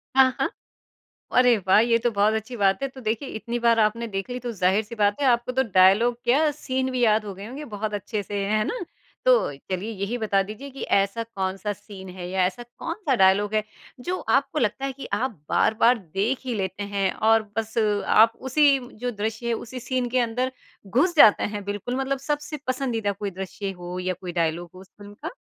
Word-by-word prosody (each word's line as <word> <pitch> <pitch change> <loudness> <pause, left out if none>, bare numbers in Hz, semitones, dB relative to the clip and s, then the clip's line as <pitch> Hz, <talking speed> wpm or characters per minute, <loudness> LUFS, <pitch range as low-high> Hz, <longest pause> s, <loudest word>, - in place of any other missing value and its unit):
हाँ, 265 -1 +7
हाँ। - - +1 0.9
अरे 250 -2 +6
वाह! 190 +2 +6
ये 230 0 +3
तो 240 +1 0
बहुत 210 +1 +2
अच्छी 220 +3 -4
बात 195 +5 +2
है। 275 - 0
तो 260 0 -12
देखिए 230 +5 -2
इतनी 235 +2 -3
बार 230 -1 +3
आपने 220 +2 +1
देख 195 +2 -4
ली 250 - -3
तो 245 -1 -4
ज़ाहिर-सी 205 +4 0
बात 205 +3 +1
है, 275 - +2
आपको 240 0 +2
तो 265 +1 +2
डायलॉग 195 +6 +5
क्या 290 +6 +3
सीन 260 -2 -2
भी 255 - -2
याद 215 -1 +3
हो 200 - -6
गए 195 +3 -9
होंगे 275 +6 -7
बहुत 210 0 -3
अच्छे 205 +1 -3
से, 200 0 -3
है 215 +1 +1
ना? 485 - -3 0.5
तो - - +4 0.2
चलिए 190 +4 -2
यही 205 +3 -3
बता 205 -3 +2
दीजिए 215 +8 -8
कि 270 - -9
ऐसा 200 +3 +1
कौन-सा 195 -2 -3
सीन 195 -2 -11
है 175 -1 -5
या 185 -1 +2
ऐसा 190 +6 -4
कौन-सा 290 - -3
डायलॉग 200 +1 +3
है, 215 - +2 0.4
जो 360 +8 -3
आपको 280 +3 +2
लगता 240 +2 0
है 275 - -2
कि 275 - -8
आप 260 +2 0 0.2
बार-बार 230 +2 +3
देख 200 +7 -2
ही 250 -3 -2
लेते 190 0 -3
हैं 200 -1 0 0.2
और 225 0 +5
बस 220 0 -3 0.3
आप 225 +1 +6
उसी 275 +1 +4 0.2
जो 245 +2 -2
दृश्य 220 +1 -4
है, - - +1
उसी 250 +3 -7
सीन 255 0 -1
के 255 +2 0
अंदर 250 +2 0 0.3
घुस 280 - +2
जाते 215 -8 +7
हैं, 205 -1 -4
बिल्कुल 205 +5 -3
मतलब 270 0 -1
सबसे 295 +1 -2
पसंदीदा 250 -5 -1
कोई 200 +1 -4
दृश्य 195 +1 -4
हो 175 +1 -6
या 185 0 -1
कोई 180 -2 -6
डायलॉग 165 +2 -2
हो 185 - -12
उस 190 - -16
फ़िल्म 205 0 -12
का? 330 - -4
220 Hz, 210 wpm, -24 LUFS, 200-255 Hz, 0.9 s, हाँ